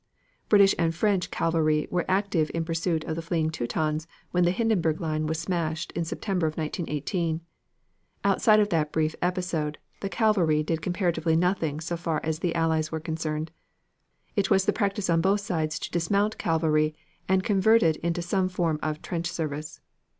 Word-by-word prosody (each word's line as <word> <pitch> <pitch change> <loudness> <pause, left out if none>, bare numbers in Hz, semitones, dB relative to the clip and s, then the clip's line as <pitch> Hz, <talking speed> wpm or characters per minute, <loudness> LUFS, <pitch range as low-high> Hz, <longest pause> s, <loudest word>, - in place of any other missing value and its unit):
British 200 -2 +6
and 165 -1 +1
French 195 -1 +1
cavalry 155 -2 +1
were 180 -1 -1
active 190 -5 +1
in 165 -1 -1
pursuit 165 -1 -1
of 160 - -3
the 165 - -3
fleeing 165 -1 0
Teutons 155 +3 -2 0.2
when 180 0 +3
the - - +4
Hindenburg 180 -6 +1
line 155 -2 -1
was 160 +1 -1
smashed 165 -2 -2
in 170 - -2
September 180 0 -1
of 155 - -4
1918. 160 +1 -2 0.8
Outside 210 +2 +4
of 210 -1 +2
that 155 -5 0
brief 155 0 +1
episode, 175 -4 -1 0.2
the 195 - -3
cavalry 185 -10 +2
did 160 +1 -2
comparatively 175 -2 0
nothing 165 -3 +1
so 170 +2 -3
far 165 -2 -1
as 160 -1 -2
the 170 -1 -1
Allies 160 -1 +1
were 160 - -2
concerned. 160 0 -3 0.8
It 200 -2 +1
was 195 -2 +4
the - - +2
practice 200 -1 -1
on 165 -1 +3
both 200 +3 +2
sides 160 -5 -1
to - - -6
dismount 200 +5 +1
cavalry 155 -2 +1 0.3
and 190 0 +3
convert 220 +3 +4
it 160 -1 +3
into 170 +1 -2
some 185 +1 0
form 170 -4 0
of 155 0 -3
trench 170 -1 -2
service. 155 -3 -4
165 Hz, 170 wpm, -27 LUFS, 155-185 Hz, 0.8 s, British